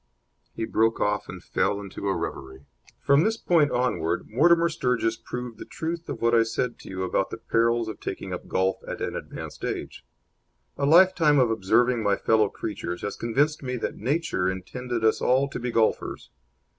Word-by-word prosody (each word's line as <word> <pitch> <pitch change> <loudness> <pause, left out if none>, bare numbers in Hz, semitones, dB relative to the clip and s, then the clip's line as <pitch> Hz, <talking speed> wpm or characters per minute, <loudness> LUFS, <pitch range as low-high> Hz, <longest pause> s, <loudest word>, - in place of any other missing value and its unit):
He 110 - -2
broke 115 +1 +1
off 105 0 0
and - - -8
fell 100 - 0
into 100 0 -6
a 95 - +1
reverie. 65 0 -6 0.3
From 140 +3 +4
this 225 +2 +1
point 165 -8 +3
onward 85 -10 -1
Mortimer 170 +8 +4
Sturgis 125 -7 0
proved 125 0 -7
the - - -6
truth 165 +1 -5
of 120 -5 -5
what 115 0 +3
I 115 - +6
said 115 +2 -2
to - - -12
you 95 0 -4
about 95 +1 0
the - - -6
perils 115 +1 +1
of 110 - -6
taking - - -5
up - - -6
golf 95 +1 +1
at - - -5
an - - -3
advanced - - -7
age. - - -4 0.7
A 140 - 0
lifetime 165 -2 +6
of 125 -4 +4
observing 115 +3 +2
my 100 -2 +2
fellow 110 -2 +2
creatures 90 -5 -5
has 100 - -3
convinced 145 +7 0
me 125 -2 -3
that - - -3
Nature 130 - 0
intended 115 +6 -4
us 110 - +3
all 130 +2 +3
to - - -5
be 125 0 -3
golfers. 115 -2 0
115 Hz, 185 wpm, -26 LUFS, 105-140 Hz, 0.7 s, I